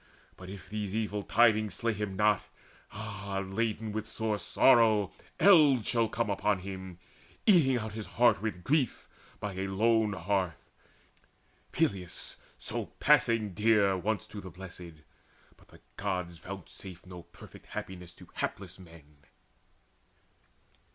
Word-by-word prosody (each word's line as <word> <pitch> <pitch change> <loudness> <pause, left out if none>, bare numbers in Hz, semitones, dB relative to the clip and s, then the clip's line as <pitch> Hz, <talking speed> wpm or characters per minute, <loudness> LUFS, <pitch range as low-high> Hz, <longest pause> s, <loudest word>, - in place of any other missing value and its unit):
But 90 0 -11
if 95 -1 -9
these 105 0 -4
evil 105 -2 -1
tidings 110 -1 +3
slay 115 -1 0
him 105 -2 -4
not, 105 0 +3 0.5
Ah, 100 -2 -5
laden 110 +2 -2
with 110 0 -4
sore 110 -2 -2
sorrow 110 -7 +4 0.3
eld 150 - +6
shall 115 -2 +1
come 115 +1 -1
Upon 100 -1 0
him, 95 -2 -7 0.5
eating 155 - +5
out 110 -2 -4
his 110 0 -6
heart 120 -4 +3
with 105 -5 -4
grief 140 -4 0 0.3
By 105 -2 -4
a 95 +1 -3
lone 110 +2 +2
hearth 95 -3 -2 1.0
Peleus 90 -3 -2 0.2
so - - -4
passing 110 -4 +3
dear 105 -1 +3
Once 100 +4 -2
to 105 0 -9
the 95 - -9
Blessed! 90 -3 -11 0.5
But - - -23
the - - -18 0.2
Gods 90 -4 -3
vouchsafe 95 -1 -9
No 90 -1 -9
perfect - - -15
happiness 90 -2 -7
to - - -15
hapless - - -4
men." 80 -5 -16
100 Hz, 130 wpm, -30 LUFS, 95-110 Hz, 1.0 s, eld